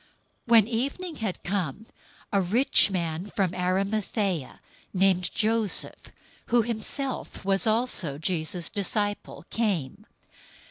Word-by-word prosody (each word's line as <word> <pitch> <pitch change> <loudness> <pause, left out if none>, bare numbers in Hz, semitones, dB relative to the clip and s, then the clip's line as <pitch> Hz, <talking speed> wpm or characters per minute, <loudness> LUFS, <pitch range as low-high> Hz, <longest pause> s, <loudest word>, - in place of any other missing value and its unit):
027:057 - - -14
When 225 -3 +7
evening 280 +9 -2
had 215 -5 -4
come, 195 +1 -2 0.5
a 200 - +4
rich 220 +6 +4
man 170 -2 -2
from 195 -4 -1
Arimathaea, 190 - -1 0.4
named 185 -1 +3
Joseph, 220 -2 0 0.4
who 235 -1 +3
himself 235 +1 -3
was 195 +3 +2
also 215 - +1
Jesus' 165 +1 -2
disciple 205 0 -2
came. 195 - -1
200 Hz, 105 wpm, -27 LUFS, 180-225 Hz, 0.5 s, When